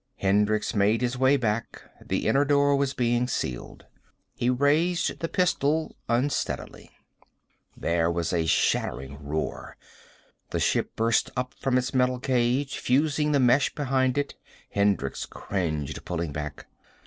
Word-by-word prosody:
Hendricks 105 Hz, +2 st, +1 dB
made 105 Hz, +2 st, +2 dB
his 125 Hz, 0 st, 0 dB
way 130 Hz, +2 st, +4 dB
back. 115 Hz, -3 st, -2 dB, 0.2 s
The -, -, -2 dB
inner 140 Hz, +1 st, +4 dB
door 145 Hz, 0 st, +3 dB
was 140 Hz, -1 st, +1 dB
being 120 Hz, 0 st, +1 dB
sealed. 60 Hz, -, -4 dB, 0.5 s
He 120 Hz, -, -1 dB
raised 150 Hz, +7 st, +1 dB
the 165 Hz, -, -3 dB
pistol 160 Hz, -3 st, +1 dB
unsteadily. 125 Hz, +5 st, -2 dB, 0.9 s
There 85 Hz, 0 st, +1 dB
was 85 Hz, 0 st, -1 dB
a 85 Hz, -2 st, +1 dB
shattering 70 Hz, -1 st, 0 dB
roar. 75 Hz, +2 st, -4 dB, 0.7 s
The -, -, -2 dB
ship -, -, 0 dB
burst 115 Hz, +1 st, +2 dB
up 125 Hz, 0 st, -2 dB
from 130 Hz, -1 st, +2 dB
its 125 Hz, +1 st, -1 dB
metal 125 Hz, -1 st, +2 dB
cage, 130 Hz, +2 st, 0 dB
fusing 150 Hz, +3 st, +1 dB
the 145 Hz, -, +3 dB
mesh 130 Hz, +2 st, +3 dB
behind 130 Hz, -2 st, +1 dB
it. 145 Hz, 0 st, -1 dB, 0.4 s
Hendricks 100 Hz, -9 st, 0 dB
cringed, 80 Hz, -7 st, -3 dB
pulling 85 Hz, -4 st, -3 dB
back. 75 Hz, 0 st, -6 dB
125 Hz, 135 wpm, -26 LUFS, 100-140 Hz, 0.9 s, way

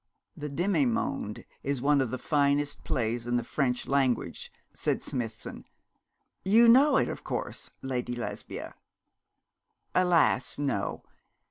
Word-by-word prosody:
'The 150 Hz, -, -5 dB
Demi 180 Hz, -, +1 dB
monde 140 Hz, -, -2 dB, 0.2 s
is 140 Hz, -1 st, -1 dB
one 140 Hz, +2 st, +3 dB
of 130 Hz, -, 0 dB
the 130 Hz, -, -3 dB
finest 145 Hz, -1 st, +1 dB
plays 115 Hz, 0 st, -1 dB
in 120 Hz, -, +1 dB
the 120 Hz, -, +1 dB
French 125 Hz, 0 st, -1 dB
language,' 135 Hz, -3 st, 0 dB, 0.2 s
said -, -, -1 dB
Smithson. 115 Hz, -3 st, -5 dB, 0.8 s
'You 225 Hz, +5 st, +6 dB
know 265 Hz, +6 st, +7 dB
it, -, -, +2 dB
of -, -, -6 dB
course, -, -, -4 dB
Lady 125 Hz, -2 st, -2 dB
Lesbia?' 120 Hz, -, -6 dB, 1.2 s
'Alas! 170 Hz, -8 st, +3 dB
no. 135 Hz, -9 st, -2 dB
140 Hz, 125 wpm, -29 LUFS, 120-160 Hz, 1.2 s, know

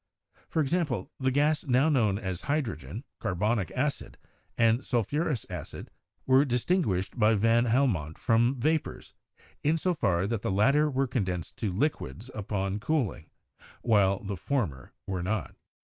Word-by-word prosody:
For 160 Hz, -, +1 dB
example, 145 Hz, -, -1 dB
the 130 Hz, -1 st, +1 dB
gases 145 Hz, +2 st, +1 dB
now 130 Hz, +4 st, +4 dB
known 115 Hz, -10 st, +2 dB
as 95 Hz, -4 st, -4 dB
hydrogen, 110 Hz, -, -3 dB, 0.2 s
carbonic 105 Hz, +3 st, 0 dB
acid, 140 Hz, +2 st, -2 dB, 0.4 s
and 115 Hz, +2 st, +3 dB
sulphurous 130 Hz, -, -1 dB
acid -, -, -8 dB, 0.3 s
were 130 Hz, +1 st, +5 dB
distinguished 125 Hz, -, 0 dB
by 110 Hz, 0 st, +5 dB
van 115 Hz, +3 st, +3 dB
Helmont 110 Hz, -, +1 dB
from 120 Hz, +3 st, +2 dB
vapors, 155 Hz, +5 st, -1 dB, 0.5 s
in 155 Hz, +3 st, +2 dB
so 180 Hz, +3 st, 0 dB
far 90 Hz, -, +1 dB
that 110 Hz, 0 st, -2 dB
the -, -, -2 dB
latter 135 Hz, +10 st, +3 dB
were 135 Hz, -1 st, +1 dB
condensed 95 Hz, -, -3 dB
to 105 Hz, -4 st, -2 dB
liquids 125 Hz, +1 st, -2 dB
upon 100 Hz, -1 st, -2 dB
cooling, 125 Hz, -, -1 dB, 0.5 s
while 100 Hz, -4 st, +3 dB
the 100 Hz, -1 st, -4 dB
former 80 Hz, -, -2 dB
were 95 Hz, -2 st, -3 dB
not. 105 Hz, +5 st, -2 dB
115 Hz, 140 wpm, -28 LUFS, 100-140 Hz, 0.5 s, were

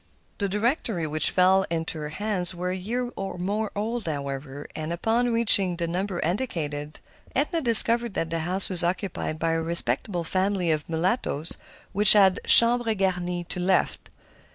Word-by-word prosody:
The 200 Hz, -2 st, -2 dB
directory 210 Hz, -, -2 dB
which 155 Hz, 0 st, +3 dB
fell 190 Hz, +1 st, +2 dB
into 165 Hz, -1 st, -3 dB
her 150 Hz, 0 st, -6 dB
hands 185 Hz, 0 st, -1 dB
was 180 Hz, +1 st, -4 dB
a -, -, -4 dB
year 240 Hz, +6 st, -5 dB
or 195 Hz, -2 st, -7 dB
more 205 Hz, +4 st, -4 dB
old, 220 Hz, 0 st, -5 dB
however, 140 Hz, -1 st, -7 dB
and 155 Hz, +1 st, -6 dB
upon 230 Hz, +7 st, -1 dB
reaching 205 Hz, -6 st, +4 dB
the 170 Hz, 0 st, -4 dB
number 180 Hz, +1 st, -4 dB
indicated, 155 Hz, -, -5 dB, 0.4 s
Edna 315 Hz, +5 st, -1 dB
discovered 235 Hz, -2 st, +4 dB
that 165 Hz, 0 st, -4 dB
the 165 Hz, -, -3 dB
house 180 Hz, +4 st, +2 dB
was 180 Hz, -2 st, +5 dB
occupied 175 Hz, -2 st, -4 dB
by 165 Hz, +1 st, -2 dB
a 165 Hz, 0 st, -2 dB
respectable 170 Hz, -, -2 dB
family 185 Hz, 0 st, -2 dB
of 155 Hz, 0 st, -4 dB
mulattoes 165 Hz, -, -3 dB, 0.4 s
who 205 Hz, -, -1 dB
had 195 Hz, -3 st, +3 dB
chambres 235 Hz, -1 st, +5 dB
garnies 180 Hz, -2 st, -3 dB
to 180 Hz, -, -5 dB
let. 185 Hz, +1 st, -2 dB
185 Hz, 160 wpm, -23 LUFS, 165-210 Hz, 0.4 s, was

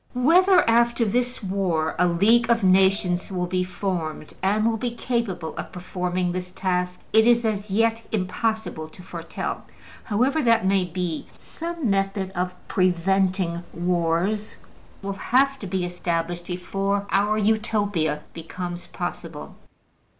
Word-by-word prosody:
Whether, 360 Hz, +8 st, +5 dB
after 235 Hz, 0 st, +3 dB
this 245 Hz, +3 st, -1 dB
war, 185 Hz, -5 st, 0 dB
a 180 Hz, -, +5 dB
League 220 Hz, +8 st, +4 dB
of 230 Hz, -2 st, +3 dB
Nations 190 Hz, -1 st, +3 dB
will 180 Hz, -1 st, -1 dB
be 180 Hz, +1 st, 0 dB
formed, 180 Hz, -5 st, -4 dB
and 210 Hz, +3 st, +2 dB
will 225 Hz, -1 st, +1 dB
be 240 Hz, +1 st, -3 dB
capable 230 Hz, -10 st, -2 dB
of -, -, -5 dB
performing 180 Hz, 0 st, -2 dB
this 180 Hz, 0 st, -4 dB
task, 180 Hz, -1 st, -1 dB
it 220 Hz, +1 st, +6 dB
is 240 Hz, -1 st, +4 dB
as 210 Hz, -1 st, -1 dB
yet 225 Hz, +3 st, +2 dB
impossible 220 Hz, -4 st, -2 dB
to 180 Hz, -, -14 dB
foretell. 170 Hz, -2 st, -5 dB, 0.4 s
However 255 Hz, +9 st, +1 dB
that 230 Hz, -5 st, +3 dB
may 190 Hz, -1 st, +3 dB
be, 175 Hz, -2 st, -3 dB
some 335 Hz, -4 st, -5 dB
method 195 Hz, -1 st, 0 dB
of 180 Hz, 0 st, -2 dB
preventing 185 Hz, -1 st, +1 dB
wars 175 Hz, +4 st, 0 dB, 0.5 s
will 200 Hz, 0 st, -2 dB
have 270 Hz, +7 st, +2 dB
to 200 Hz, -, -6 dB
be 185 Hz, -1 st, -1 dB
established 175 Hz, -1 st, -2 dB
before 195 Hz, +3 st, -1 dB
our 205 Hz, +2 st, +2 dB
Utopia 205 Hz, -8 st, +1 dB
becomes 175 Hz, +1 st, -6 dB
possible. 165 Hz, -3 st, -6 dB
190 Hz, 135 wpm, -24 LUFS, 180-220 Hz, 0.5 s, it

